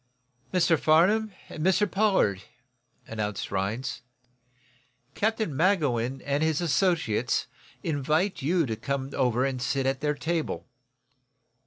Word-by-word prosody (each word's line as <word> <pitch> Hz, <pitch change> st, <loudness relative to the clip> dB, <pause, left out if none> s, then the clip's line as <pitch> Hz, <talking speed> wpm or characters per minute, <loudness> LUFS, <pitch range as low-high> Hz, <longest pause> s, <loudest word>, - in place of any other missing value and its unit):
"Mr. 170 Hz, -3 st, +3 dB
Farnum, 200 Hz, +8 st, +4 dB, 0.2 s
and 155 Hz, -, -6 dB
Mr 190 Hz, +3 st, +3 dB
Pollard," 190 Hz, -, +2 dB, 0.6 s
announced 105 Hz, -3 st, -4 dB
Rhinds, 100 Hz, +7 st, -2 dB, 1.1 s
"Captain 220 Hz, -7 st, -1 dB
Magowan 135 Hz, -, +1 dB
and 140 Hz, +1 st, 0 dB
his 160 Hz, -1 st, +1 dB
associates 170 Hz, -, +1 dB, 0.4 s
invite 155 Hz, +5 st, 0 dB
you 165 Hz, +4 st, +2 dB
to 115 Hz, -4 st, -2 dB
come 135 Hz, +3 st, -3 dB
over 125 Hz, -1 st, +1 dB
and 130 Hz, -2 st, -2 dB
sit 135 Hz, +2 st, 0 dB
at 135 Hz, 0 st, 0 dB
their 150 Hz, 0 st, 0 dB
table. 165 Hz, +2 st, -2 dB
150 Hz, 115 wpm, -27 LUFS, 130-180 Hz, 1.1 s, Farnum